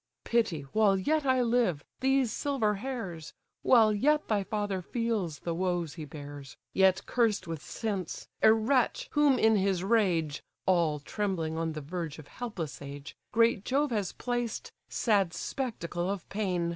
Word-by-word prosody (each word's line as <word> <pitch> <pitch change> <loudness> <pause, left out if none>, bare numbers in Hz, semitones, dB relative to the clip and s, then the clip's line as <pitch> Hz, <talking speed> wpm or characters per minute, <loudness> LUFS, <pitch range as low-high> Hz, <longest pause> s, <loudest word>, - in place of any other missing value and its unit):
Pity, 220 -10 +1
while 210 -3 +4
yet 295 +9 +1
I 260 -1 +4
live, 230 -11 +1
these 265 -3 +2
silver 255 -7 0
hairs; 195 - -5 0.3
While 225 -4 +5
yet 300 +8 +2
thy 205 -2 +2
father 205 -2 -2
feels 215 -6 -2
the 170 - -3
woes 175 -3 -1
he 160 -3 -7
bears, 145 -2 -9 0.2
Yet 190 -1 +4
cursed 225 -6 +1
with 165 -3 -5
sense! 200 -4 -4
a 220 - +8
wretch, 230 +3 +1
whom 290 -3 +4
in 220 -2 +4
his 190 -2 +1
rage 180 -9 +1 0.2
(All 170 -5 +3
trembling 170 -1 -2
on 165 0 -1
the 155 - -5
verge 165 0 -5
of 155 -2 -12
helpless 200 - -5
age) 140 +1 -8 0.2
Great 230 -3 +3
Jove 280 +3 +1
has 205 -5 -1
placed, 240 -2 -3 0.2
sad 200 -6 +2
spectacle 180 -9 -3
of 200 -3 -4
pain! 185 -5 -1
200 Hz, 155 wpm, -30 LUFS, 170-235 Hz, 0.3 s, a